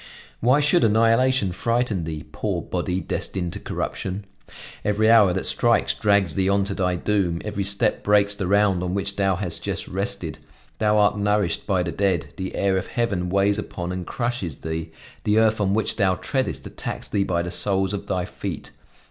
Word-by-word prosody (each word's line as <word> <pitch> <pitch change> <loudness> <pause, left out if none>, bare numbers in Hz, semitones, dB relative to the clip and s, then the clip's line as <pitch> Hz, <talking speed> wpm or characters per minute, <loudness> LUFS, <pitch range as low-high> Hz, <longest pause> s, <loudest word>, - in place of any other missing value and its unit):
Why 130 +5 +4
should 150 +4 +3
annihilation 115 0 +3
frighten 115 -2 0
thee, 80 -2 -5
poor - - -2
body, 90 +1 -2
destined 90 -3 -3
to - - -5
corruption? 95 +2 -4 0.6
Every 110 +2 +3
hour 105 -5 +6
that 95 +1 -2
strikes 120 -1 +3
drags 100 -6 +2
thee 95 +4 +1
on 100 0 +3
to 100 0 -3
thy 90 -2 0
doom, 90 -3 0
every 105 -2 -2
step 100 +3 0
breaks 105 0 +3
the 100 -2 -3
round 100 -2 +3
on 90 +1 -2
which 100 0 -1
thou 95 -1 +1
hast 85 -3 -2
just - - -3
rested; - - -3 0.4
thou 105 -1 +3
art 105 0 +3
nourished 105 -3 0
by 95 -3 +2
the 85 - -3
dead; 95 -2 -1
the 95 0 -4
air 100 -1 +1
of - - -7
heaven 100 -7 -1
weighs 100 +2 +2
upon 90 -4 -5
and 90 -1 -5
crushes 120 - -3
thee, 80 0 -4 0.3
the 105 0 +2
earth 110 -1 +3
on 100 0 +1
which 110 - 0
thou 95 -4 +3
treadest 130 +8 -2
attacks - - -5
thee 100 - 0
by 85 -3 -1
the 90 - -5
soles 95 0 +1
of 100 - -5
thy 90 -2 -1
feet. - - -6
100 Hz, 190 wpm, -23 LUFS, 90-105 Hz, 0.6 s, hour